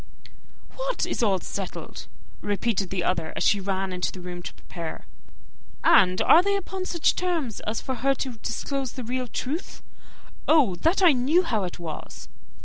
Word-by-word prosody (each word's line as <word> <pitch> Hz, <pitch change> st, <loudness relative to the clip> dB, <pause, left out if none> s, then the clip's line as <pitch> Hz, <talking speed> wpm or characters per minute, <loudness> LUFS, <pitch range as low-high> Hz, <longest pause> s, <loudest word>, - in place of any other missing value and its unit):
"What -, -, -1 dB
is -, -, -2 dB
all 200 Hz, -5 st, +3 dB
settled?" 195 Hz, +1 st, -6 dB, 0.3 s
repeated 205 Hz, -1 st, 0 dB
the 185 Hz, -3 st, -1 dB
other, 165 Hz, -3 st, -1 dB
as -, -, -1 dB
she 205 Hz, -, +4 dB
ran 190 Hz, -1 st, -2 dB
into 180 Hz, 0 st, -1 dB
her 180 Hz, -, -10 dB
room 175 Hz, -1 st, -6 dB
to -, -, -7 dB
prepare. 165 Hz, -2 st, -7 dB, 0.8 s
"And 185 Hz, -1 st, +6 dB
are 335 Hz, -, +8 dB
they 400 Hz, +2 st, +1 dB
upon 380 Hz, -1 st, -4 dB
such 340 Hz, -3 st, +2 dB
terms 330 Hz, -, -1 dB
as 220 Hz, +1 st, -1 dB
for 260 Hz, -, -3 dB
her 270 Hz, +2 st, +1 dB
to 260 Hz, -1 st, -3 dB
disclose 265 Hz, +4 st, -3 dB
the 255 Hz, -, -6 dB
real 250 Hz, +2 st, -2 dB
truth? 295 Hz, +9 st, -4 dB, 0.6 s
Oh, 295 Hz, -, +5 dB
that 340 Hz, -, +2 dB
I 350 Hz, -, +8 dB
knew 285 Hz, +7 st, +3 dB
how 220 Hz, -, 0 dB
it 175 Hz, -, -6 dB
was!" 165 Hz, -3 st, -7 dB
235 Hz, 170 wpm, -26 LUFS, 185-310 Hz, 0.8 s, are